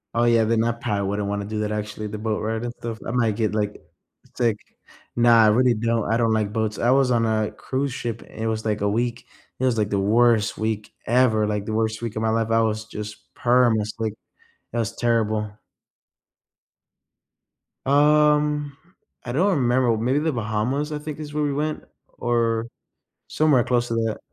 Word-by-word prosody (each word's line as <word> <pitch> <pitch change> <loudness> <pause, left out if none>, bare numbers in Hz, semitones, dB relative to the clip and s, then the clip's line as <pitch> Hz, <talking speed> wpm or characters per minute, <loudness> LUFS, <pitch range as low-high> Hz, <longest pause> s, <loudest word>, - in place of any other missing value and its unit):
Oh, 120 - +3
yeah, 115 -1 +4
then 115 0 +2
I 120 - +1
probably 105 -4 -2
wouldn't 100 0 -2
wanna 100 0 -2
do 105 +1 -4
that 105 0 -2
actually, 105 0 -4
the 105 - -6
boat 110 0 -2
ride 110 +2 -2
and 120 - -4
stuff. 115 -1 -5
I - - -2
might 115 -4 +1
get, 110 -1 0
like, 105 -1 -2 0.5
sick. 115 -4 +1 0.6
Nah, 120 -1 +6
I - - +5
really 125 +3 +4
don't 115 -1 0
I 115 - +3
don't 115 -1 +2
like 105 -2 0
boats. 110 -2 -1
I 120 - +2
was 135 -1 +3
on 115 -1 +2
a 110 -1 0
cruise 135 0 -3
ship 115 -2 -4
and - - -14
it 115 - -1
was, 110 0 -2
like, 105 -2 -1
a 100 - +1
week, 120 +3 -2 0.3
it 130 - 0
was, 125 -3 +1
like, 105 -1 0
the 100 - +1
worst 115 +2 +3
week 110 -1 -3
ever, 115 -3 +3
like, 105 -1 -2
the 110 - -3
worst 110 0 -1
week 115 -2 -4
of 110 - -2
my 110 - +2
life, 115 0 0
I 115 0 +4
was 110 0 -1
just 105 -1 -9
perm 120 -2 +3
it's 105 0 -3
like, 110 -2 -1 0.6
it 120 - -4
was 110 -3 -2
terrible. 110 -3 0 2.3
Um, 150 0 +3 0.5
I 120 - -5
don't 180 +11 +2
remember, 125 -2 +2
maybe 125 +6 +1
the 160 0 0
Bahamas, 120 +6 -1
I 150 - -3
think, 150 0 -7
is 150 -1 -7
where 150 0 0
we 145 -1 0
went, 150 +2 -2 0.3
or 115 -1 0 0.6
somewhere 150 -6 +3
close 120 -1 +1
to 115 - -2
that. 115 -1 -1
115 Hz, 200 wpm, -23 LUFS, 110-125 Hz, 2.3 s, Nah